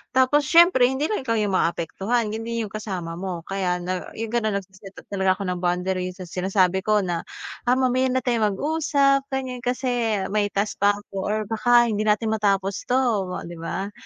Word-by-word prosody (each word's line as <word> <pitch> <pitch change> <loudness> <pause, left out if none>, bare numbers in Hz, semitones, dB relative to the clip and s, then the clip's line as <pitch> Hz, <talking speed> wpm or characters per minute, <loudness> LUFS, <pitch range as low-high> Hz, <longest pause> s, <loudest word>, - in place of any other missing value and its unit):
Tapos 275 +3 +3
siyempre 335 -7 +6
hindi 270 +4 -1
lang 425 - 0
ikaw 230 - +1
'yong 210 -2 0
maapektuhan, 195 +6 0
hindi 230 +1 -3
'yong 210 - -7
kasama 180 -6 -5
mo. 180 -3 -4
Kaya 190 -1 -1
na 185 0 -3
'yong 225 0 -4
gano'n 220 -3 0
nagse-set 195 0 -8 0.2
talaga 190 -1 +2
ako 200 - -5
ng 180 - -3
boundaries. 180 +1 -1
So 185 - -8
sinasabi 185 +1 +1
ko 210 +1 +1
na, 175 -2 -3 0.4
Ah, 250 - +5
mamaya 255 0 +2
na 255 -1 0
tayong 220 -5 +1
mag-usap. 280 0 +1
Ganyan, 260 -2 -4
kasi 245 -4 -1
may 210 0 +1
task 200 +1 -2
pa 205 0 +4
ako 205 0 -14 0.2
or 215 +1 0
baka 240 +2 +3
hindi 215 +1 -1
natin 215 +1 +2
matapos 200 -2 0
to, 250 - +1 0.5
'di 170 -1 -9
ba? 195 +4 -4
210 Hz, 185 wpm, -23 LUFS, 190-245 Hz, 0.5 s, siyempre